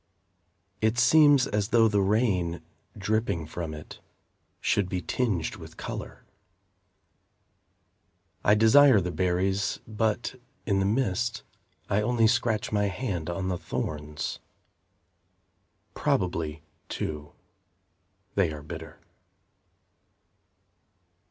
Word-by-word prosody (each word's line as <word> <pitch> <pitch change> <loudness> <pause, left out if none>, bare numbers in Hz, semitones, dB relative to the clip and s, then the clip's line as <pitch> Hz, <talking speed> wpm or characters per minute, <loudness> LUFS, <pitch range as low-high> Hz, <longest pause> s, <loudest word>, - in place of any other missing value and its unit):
It 110 +2 +2
seems 140 +1 +6
as 105 -1 -1
though 115 0 +4
the 105 -2 +2
rain, 95 -5 +1 0.3
Dripping 105 -5 -1
from 80 0 -5
it, 75 - -11 0.6
Should 100 -3 +1
be 90 - -1
tinged 95 -4 -1
with - - -12
colour. - - -7 2.2
I 105 - +5
desire 115 +3 +6
the 90 -1 -2
berries, 95 +3 0
But, 110 +3 -2 0.2
in 100 -2 +1
the 95 - +1
mist, 110 0 0 0.4
I 100 +2 +1
only 115 +1 +2
scratch 110 -2 +1
my 105 -1 +1
hand 95 -5 -3
on 95 +2 -2
the 90 -2 -2
thorns. 75 0 -4 1.5
Probably, 80 -4 -1 0.3
too, 75 -1 -5 1.0
they 95 -5 +2
are 75 -1 -8
bitter. - - -9
100 Hz, 100 wpm, -27 LUFS, 90-115 Hz, 2.2 s, seems